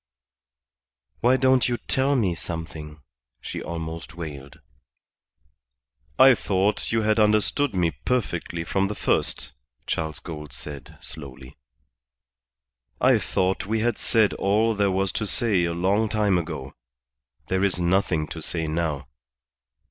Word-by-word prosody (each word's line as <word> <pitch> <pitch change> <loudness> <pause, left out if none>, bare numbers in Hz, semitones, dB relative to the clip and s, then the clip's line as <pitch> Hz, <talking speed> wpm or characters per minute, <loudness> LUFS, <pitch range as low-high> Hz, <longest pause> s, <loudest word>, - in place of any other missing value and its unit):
"Why 125 +2 +4
don't 130 -1 +3
you 120 - 0
tell 135 +3 +1
me 100 -9 +2
something?" 80 -3 -7 0.4
she - - -6
almost 80 0 -6
wailed. 75 -3 -8 1.6
"I 130 0 +8
thought 100 -2 0
you 115 -1 +1
had 110 +1 +2
understood 105 +5 +2
me 85 -2 +2
perfectly 85 -9 -2
from 95 +3 0
the 105 - -4
first," - - -1 0.3
Charles 80 -1 -2
Gould 75 -3 -8
said, 70 -2 -9
slowly. 65 -4 -10 1.4
"I - - +5
thought 95 +1 -1
we 110 +1 0
had 120 0 0
said 110 -3 +3
all 110 +4 +2
there 100 -1 +2
was 95 0 +1
to 105 - -2
say 105 -7 +1
a 85 - -1
long 100 +6 +1
time 105 -4 +2
ago. 70 -5 -6 0.8
There 95 +1 +1
is 95 -2 +1
nothing 85 -3 +1
to 80 - -6
say 80 +1 -2
now. 80 -4 -2
95 Hz, 130 wpm, -25 LUFS, 80-110 Hz, 1.6 s, I